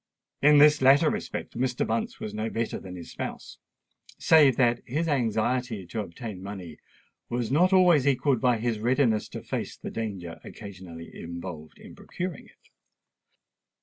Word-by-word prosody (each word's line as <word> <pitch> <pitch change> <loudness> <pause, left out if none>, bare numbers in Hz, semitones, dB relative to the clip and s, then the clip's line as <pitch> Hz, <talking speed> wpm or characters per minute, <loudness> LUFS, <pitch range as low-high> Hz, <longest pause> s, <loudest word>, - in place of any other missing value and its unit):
In 150 +1 +6
this 150 0 +6
latter 140 +4 +6
respect - - -5
Mr. 125 -1 0
Bunce 115 +1 -2
was 105 - -5
no 110 +1 -2
better 115 0 -3
than 90 -1 -9
his 85 -2 -9
spouse—save 150 -6 0
that 120 -2 +3
his 155 +7 -2
anxiety 120 - 0
to 85 +6 -5
obtain 105 0 -6
money 95 -5 -8 0.5
was 120 -1 -2
not 175 +7 +4
always 175 -7 +5
equalled 135 -2 +2
by 125 -2 +3
his 115 -1 -1
readiness 120 -1 +2
to - - -8
face - - -4
the - - -7
danger 95 -7 -5
occasionally 90 -4 -10
involved 85 -2 -8
in - - -13
procuring 180 -4 -6
it. - - -25
115 Hz, 150 wpm, -27 LUFS, 100-140 Hz, 0.5 s, In